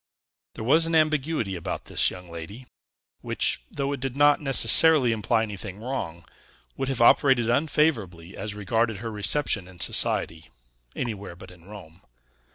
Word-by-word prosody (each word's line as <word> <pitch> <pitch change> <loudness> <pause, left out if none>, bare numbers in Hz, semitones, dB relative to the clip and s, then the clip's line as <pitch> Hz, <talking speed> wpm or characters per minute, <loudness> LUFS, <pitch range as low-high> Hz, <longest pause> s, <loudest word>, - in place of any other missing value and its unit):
There - - -7
was 160 +8 +3
an 165 - -1
ambiguity 155 -9 0
about 85 - -5
this - - +1
young 90 -1 -11
lady, 100 +10 -9 0.6
which, - - -2
though 140 0 -3
it 140 - -5
did 135 0 -4
not 145 +1 +4
necessarily 135 +1 +5
imply 110 +1 0
anything 100 -2 -7
wrong, 95 -9 -5 0.5
would 135 - -3
have 130 -3 0
operated 120 -2 +4
unfavorably 120 - -1
as 105 -1 -5
regarded 110 +2 -1
her 115 +3 -6
reception 105 -1 0
in 90 -1 -15
society, 80 -1 -1 0.5
anywhere 105 -7 -5
but 95 +1 -13
in 85 -2 -18
Rome. 95 -4 -13
115 Hz, 150 wpm, -25 LUFS, 95-135 Hz, 0.6 s, necessarily